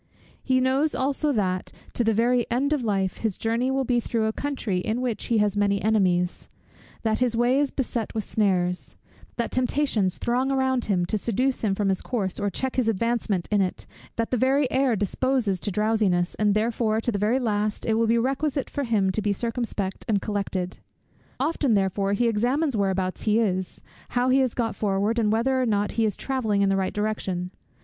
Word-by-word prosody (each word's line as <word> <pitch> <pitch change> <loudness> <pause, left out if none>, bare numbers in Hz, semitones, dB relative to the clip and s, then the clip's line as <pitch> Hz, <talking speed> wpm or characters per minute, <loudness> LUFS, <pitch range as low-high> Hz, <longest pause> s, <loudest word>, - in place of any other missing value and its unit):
He 260 -1 +2
knows 265 +4 +1
also 280 +3 +1
that, 185 -5 -1 0.2
to 240 - 0
the 225 - +3
very 240 +1 +2
end 270 +5 +1
of 285 -5 -1
life, 195 -4 0
his 220 -4 -2
journey 230 +3 0
will 270 0 +1
be 245 -1 +1
through 230 -1 -1
a 220 - 0
country 245 -10 -2
in 220 +6 -2
which 250 -3 -2
he 230 - +1
has 210 -1 +2
many 200 -1 +2
enemies; 185 -5 +1 0.5
that 220 -1 +1
his 245 -2 +1
way 245 +3 +3
is 290 -1 +2
beset 240 -5 -3
with 220 - -1
snares; 180 -5 0 0.4
that 235 -1 -2
temptations 250 -7 +1
throng 255 +3 0
around 260 -2 +1
him, 180 -4 +1
to 210 +4 -1
seduce 250 +5 0
him 200 -3 +1
from 200 -1 0
his 190 - 0
course 200 -7 -2
or 205 -1 0
check 260 +7 -3
his 250 -3 +2
advancement 225 -4 0
in 205 -1 +3
it; 185 -1 -2 0.3
that 230 0 -2
the 250 - +2
very 270 +4 +3
air 260 -3 +2
disposes 210 0 0
to 205 - -3
drowsiness, 205 -3 +1
and 210 -1 +1
that - - +4
therefore 220 -1 0
to 240 - -1
the 205 - -2
very 215 +5 +2
last 215 -4 -1
it 225 - +1
will 225 +1 +2
be 230 +1 +3
requisite 270 +3 -1
for 285 - -2
him 205 -5 +2
to 215 - -2
be 205 0 0
circumspect 225 -3 -3
and 210 -3 +2
collected. 195 -3 -3 0.6
Often 280 -4 +1
therefore 195 0 +1
he 235 +4 +2
examines 250 +6 +1
whereabouts 190 -2 -1
he 215 0 +3
is, 190 -5 -1 0.3
how 245 +1 +1
he 260 +1 +4
has 260 -3 +1
got 230 -2 -1
forward, 205 +3 0
and 210 -2 +2
whether 260 +4 +1
or 250 - +1
not 205 -1 +1
he 225 - +1
is 210 - -1
travelling 220 -7 0
in 195 - +3
the 195 - +2
right 190 -1 0
direction. 195 -4 -2
220 Hz, 205 wpm, -25 LUFS, 200-250 Hz, 0.6 s, that